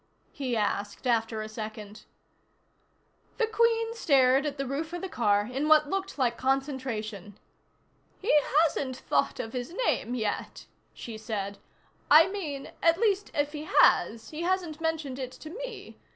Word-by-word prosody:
he 255 Hz, -4 st, -2 dB
asked 205 Hz, +1 st, -2 dB
after 225 Hz, -2 st, +1 dB
a -, -, -6 dB
second. 215 Hz, -1 st, -8 dB, 1.3 s
The 460 Hz, -, +3 dB
Queen 455 Hz, +1 st, +2 dB
stared 275 Hz, -, +3 dB
at 290 Hz, 0 st, -4 dB
the 275 Hz, -, -2 dB
roof 300 Hz, +5 st, -4 dB
of 350 Hz, -, -4 dB
the -, -, -2 dB
car 210 Hz, -, +2 dB
in 265 Hz, +6 st, -2 dB
what 305 Hz, -1 st, +5 dB
looked 390 Hz, -2 st, -3 dB
like 240 Hz, -4 st, 0 dB
concentration. 255 Hz, -7 st, -2 dB, 0.8 s
"He 425 Hz, -, 0 dB, 0.3 s
hasn't 270 Hz, -5 st, -1 dB
thought -, -, 0 dB
of 225 Hz, -, -5 dB
his 250 Hz, +7 st, -5 dB
name 245 Hz, -, 0 dB
yet," 215 Hz, -4 st, -3 dB, 0.3 s
she 225 Hz, -2 st, -8 dB
said. 200 Hz, -2 st, -4 dB, 0.5 s
"I 315 Hz, +3 st, +8 dB
mean, 310 Hz, -9 st, -5 dB
at 330 Hz, 0 st, +4 dB
least, 410 Hz, -2 st, +1 dB
if 290 Hz, -1 st, +1 dB
he 300 Hz, 0 st, -6 dB
has, 230 Hz, -6 st, +3 dB
he 310 Hz, +1 st, -5 dB
hasn't 345 Hz, -3 st, -1 dB
mentioned 315 Hz, -5 st, -2 dB
it 255 Hz, -1 st, -5 dB
to 310 Hz, -, -10 dB
me. -, -, -8 dB
275 Hz, 150 wpm, -28 LUFS, 225-330 Hz, 1.3 s, I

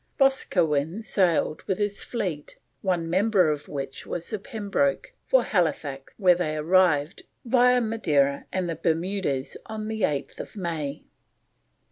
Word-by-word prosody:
Boscawen 180 Hz, -, +2 dB
sailed 175 Hz, -7 st, +1 dB
with 190 Hz, -, 0 dB
his 205 Hz, -1 st, -2 dB
fleet, 180 Hz, -11 st, -4 dB, 0.3 s
one 180 Hz, -4 st, 0 dB
member 185 Hz, -1 st, +3 dB
of 150 Hz, -1 st, -4 dB
which 135 Hz, -2 st, -6 dB
was 170 Hz, -1 st, -4 dB
the 215 Hz, -, -2 dB
Pembroke, 225 Hz, -, -1 dB
for -, -, +4 dB
Halifax, 150 Hz, -7 st, -1 dB
where 185 Hz, -4 st, +5 dB
they 155 Hz, -3 st, -2 dB
arrived, 160 Hz, -1 st, +2 dB, 0.2 s
via 250 Hz, +1 st, +4 dB
Madeira 150 Hz, -12 st, +1 dB
and 185 Hz, -1 st, -1 dB
the 165 Hz, -, -2 dB
Bermudas, 165 Hz, -4 st, -1 dB
on 215 Hz, -1 st, -5 dB
8th 190 Hz, -5 st, -3 dB
May. 155 Hz, -6 st, -3 dB
180 Hz, 125 wpm, -26 LUFS, 150-215 Hz, 0.3 s, where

